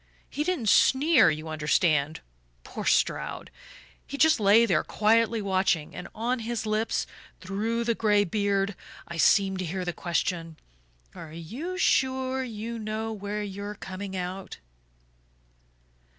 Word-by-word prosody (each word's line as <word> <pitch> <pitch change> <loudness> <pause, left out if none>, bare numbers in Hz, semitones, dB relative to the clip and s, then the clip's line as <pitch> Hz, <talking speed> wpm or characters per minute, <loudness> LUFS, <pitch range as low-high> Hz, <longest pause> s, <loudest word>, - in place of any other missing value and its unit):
He 295 - -1
didn't 320 -10 -1
sneer, 265 - +5
you 155 +1 -3
understand, 155 -1 +1 0.4
poor - - -7
Stroud - - 0 0.6
he 280 - -6
just 315 -1 +4
lay 210 +3 +6
there 175 -8 +2
quietly 225 +1 +2
watching, 185 -5 0
and 180 - -7
on 240 +3 -1
his 230 0 -3
lips, 215 +1 0 0.3
through 215 +5 -2
the 235 0 +1
gray 210 -2 +3
beard, 200 0 0 0.3
I 170 - -7
seemed 190 +3 +3
to 185 - -2
hear 180 +2 -3
the 175 - -2
question: 165 -2 -2 0.6
'Are 155 - -10
you 250 - -6
sure 260 -5 +1
you 230 -1 -6
know 220 +1 -3
where 205 0 -4
you're 200 +1 -6
coming 190 0 -7
out? 185 +1 -5
205 Hz, 135 wpm, -27 LUFS, 185-230 Hz, 0.6 s, lay